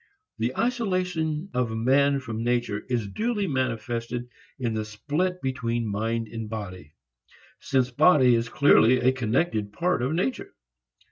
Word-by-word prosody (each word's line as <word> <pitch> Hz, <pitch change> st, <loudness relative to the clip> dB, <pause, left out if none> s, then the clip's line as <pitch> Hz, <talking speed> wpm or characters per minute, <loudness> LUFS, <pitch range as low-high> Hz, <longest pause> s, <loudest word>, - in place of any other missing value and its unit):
The 120 Hz, +3 st, -1 dB
isolation 185 Hz, -8 st, -1 dB
of 115 Hz, -3 st, -1 dB
man 140 Hz, +4 st, +3 dB
from 115 Hz, -3 st, -5 dB
nature 120 Hz, -3 st, 0 dB
is 120 Hz, -4 st, -1 dB
duly 215 Hz, -, -1 dB
manifested 120 Hz, -, -2 dB, 0.3 s
in 120 Hz, -4 st, -2 dB
the 110 Hz, 0 st, -1 dB
split 150 Hz, +12 st, -2 dB
between 120 Hz, -3 st, -1 dB
mind 110 Hz, +2 st, -2 dB
and 115 Hz, -1 st, -6 dB
body 95 Hz, -8 st, -7 dB, 0.6 s
since 130 Hz, -2 st, 0 dB
body 140 Hz, -2 st, +5 dB
is 115 Hz, 0 st, 0 dB
clearly 130 Hz, -4 st, +5 dB
a 130 Hz, +1 st, +3 dB
connected 120 Hz, -3 st, -1 dB
part 170 Hz, -, 0 dB
of 130 Hz, +5 st, 0 dB
nature. 135 Hz, -6 st, -2 dB
125 Hz, 135 wpm, -26 LUFS, 115-150 Hz, 0.6 s, body